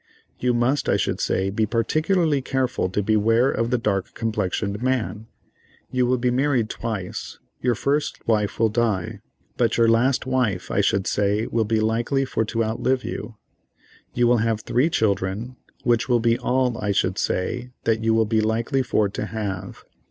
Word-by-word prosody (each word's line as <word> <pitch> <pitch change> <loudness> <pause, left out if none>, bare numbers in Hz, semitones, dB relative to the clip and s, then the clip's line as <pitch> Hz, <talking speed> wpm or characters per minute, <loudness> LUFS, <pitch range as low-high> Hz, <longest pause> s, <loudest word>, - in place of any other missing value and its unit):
You 125 -1 +1
must, 130 +4 +1
I - - +3
should - - -1
say, 95 +1 0
be 110 +2 0
particularly 155 - +1
careful 130 -7 -1
to 100 +3 -1
beware 115 +5 +3
of 115 0 -1
the 125 - +2
dark 105 -4 -2
complexioned 105 -2 -2
man. 120 -4 -1 0.6
You 125 -1 +1
will 130 +1 +2
be 125 0 +1
married 130 -3 +1
twice; 110 -6 -5 0.2
your 125 -2 +1
first 145 +6 -1
wife 105 -3 +1
will 115 -1 +3
die, 110 -5 -1 0.4
but - - +1
your 115 -1 +4
last 120 +4 +2
wife, 125 -8 -1
I 100 - +2
should 100 -1 +1
say, 105 +2 +1
will 115 -1 0
be 110 +1 +1
likely 115 +5 +1
for 110 - -1
to 115 +1 -1
outlive 125 +4 0
you. 115 - -6 0.8
You 120 - +3
will 120 0 +4
have 110 -1 0
three 130 +7 +1
children, 105 - -1 0.3
which 120 +1 +1
will 120 -1 +4
be 115 0 +3
all, 125 -2 0
I 105 -1 0
should 95 0 0
say, 125 +7 -2
that 115 -1 +1
you 110 0 +3
will 110 0 +3
be 110 0 +1
likely 115 +5 0
for 110 -4 +1
to 100 - -4
have." 100 -4 -5
115 Hz, 175 wpm, -23 LUFS, 105-125 Hz, 0.8 s, your